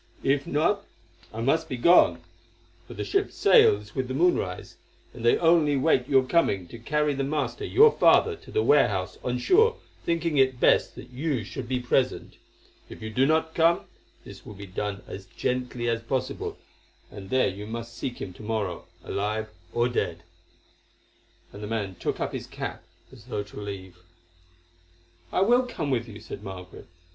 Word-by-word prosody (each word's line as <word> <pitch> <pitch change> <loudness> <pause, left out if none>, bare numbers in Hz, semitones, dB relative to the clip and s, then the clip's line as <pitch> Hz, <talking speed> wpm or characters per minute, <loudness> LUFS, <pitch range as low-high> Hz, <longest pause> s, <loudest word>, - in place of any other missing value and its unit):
If 140 +1 +1
not, 170 +8 +1 0.5
I 110 - -5
must 160 +6 +1
be 130 - -3
gone, 120 - +5 0.7
for - - -10
the 105 - -3
ship 100 - 0
sails 105 +1 +4
with 130 -1 -2
the 130 - -4
moonrise, 140 - 0 0.4
and 120 - -10
they 120 - +4
only 165 -4 +4
wait 130 -3 +2
your 135 -2 +5
coming 115 - +1
to 115 - -10
carry 150 +4 0
the 135 0 -2
master, 140 -3 -2
your 445 +3 +6
father, 440 -1 +4
to - - -15
the 435 - +1
warehouse 435 - +2
on - - -1
shore 445 +5 +4 0.3
thinking 165 -2 0
it 130 -2 +3
best - - +3
that - - -11
you 135 -2 -2
should 120 +5 -7
be 130 0 -1
present. 125 +1 -1 0.5
If - - -10
you 110 - -5
do 130 +4 +2
not 160 +1 +1
come, 165 +1 +3 0.4
this - - -12
will 105 - -10
be 100 +1 -9
done 100 +1 -4
as 95 0 -9
gently 125 -1 -3
as 115 0 0
possible, 130 +3 -3 0.5
and 100 -2 -10
there 130 +3 +3
you 105 +2 -7
must 115 +1 -6
seek 125 -1 -5
him 90 - -6
to - - -14
morrow, 105 -6 -3 0.2
alive 105 +4 -2 0.2
or 120 +1 +1
dead." 85 -9 -2 1.3
And 100 - -9
the 105 - -5
man 105 -3 -3
took - - -3
up - - -2
his - - -5
cap - - -6 0.3
as - - -15
though 105 - -3
to 105 0 -10
leave. 95 -3 -7 1.3
"I - - +1
will 245 +5 +4
come 155 - -3
with 120 -2 0
you," 110 -1 -10
said - - -9
Margaret. 95 -3 -9
125 Hz, 175 wpm, -26 LUFS, 105-150 Hz, 1.3 s, your